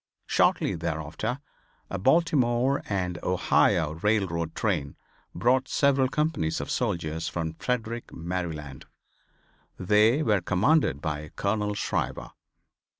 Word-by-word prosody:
Shortly - - +2
thereafter 80 - -3 0.5
a 95 - -3
Baltimore 135 - +2
and 90 -3 -2
Ohio 85 -3 +2
railroad 95 -6 0
train 70 0 -1 0.4
brought 125 +8 +2
several 140 -2 +3
companies 150 - -1
of - - -5
soldiers 80 -1 -2
from 80 -2 -3
Frederick, 120 +3 -3
Maryland. 80 -5 -5 0.9
They 105 - +3
were 105 -6 +2
commanded 100 - +2
by 75 0 -4
Colonel 105 0 -1
Shriver. - - -2
95 Hz, 100 wpm, -27 LUFS, 80-120 Hz, 0.9 s, several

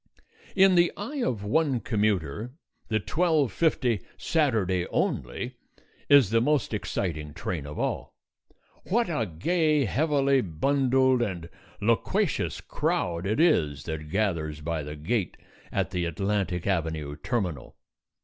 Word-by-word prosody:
In 195 -1 +6
the 175 -1 +4
eye 260 +8 -4
of 115 - -1
one 140 +3 +1
commuter, 105 - -1 0.3
the 110 -1 +1
12:50 145 - +1 0.2
SATURDAY 110 - +1
ONLY - - -2 0.5
is 140 -8 +6
the 115 0 +4
most 145 -2 +1
exciting 80 -8 -3
train 85 -4 -4
of 75 - -8
all. - - -3 0.7
What 230 +3 +2
a 120 -10 -1
gay, 150 - +1
heavily 140 +2 +2
bundled, 130 - +2
and 90 -7 -3 0.3
loquacious - - 0
crowd 85 +1 -1
it 110 +6 0
is 75 - +3
that 80 -2 -5
gathers 80 -6 -1
by 80 +1 -2
the 75 +1 -6
gate 95 +6 -2 0.3
at - - -1
the 90 -2 -1
Atlantic 95 +1 -1
Avenue 80 -6 -1
terminal. 90 - -3
105 Hz, 120 wpm, -27 LUFS, 85-140 Hz, 0.7 s, In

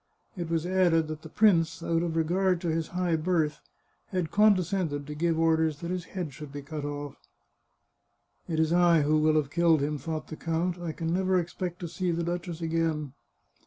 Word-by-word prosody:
It 175 -3 -4
was 165 0 0
added 175 -3 +3
that 155 0 -5
the 160 - -10
prince, 170 -4 +3
out 165 0 +1
of 170 -2 -2
regard 180 +3 +2
to 170 - -1
his 160 0 -1
high 180 -2 0
birth, 155 -2 0 0.5
had 180 -5 -2
condescended 185 -7 +2
to 150 - -6
give 165 +2 0
orders 160 -2 +2
that 170 +1 -4
his 180 -1 -3
head 175 -7 -5
should 150 -1 -9
be 145 0 -7
cut 150 +1 -6
off. 145 -1 -5 0.7
" - - -46
It 160 -1 -1
is 160 +1 +2
I 175 -2 +5
who 155 +1 +3
will 155 0 +3
have 145 -2 +1
killed 165 -3 +3
him," 145 +1 -1
thought 155 +3 -5
the 155 - -6
count. 170 +3 -2
" - - -10
I 170 -2 -3
can 165 +1 -3
never 185 0 +2
expect 175 +1 -4
to 175 - -3
see 180 +2 -2
the 170 0 0
duchess 175 0 -4
again." 160 -4 -1
165 Hz, 205 wpm, -28 LUFS, 155-175 Hz, 0.7 s, I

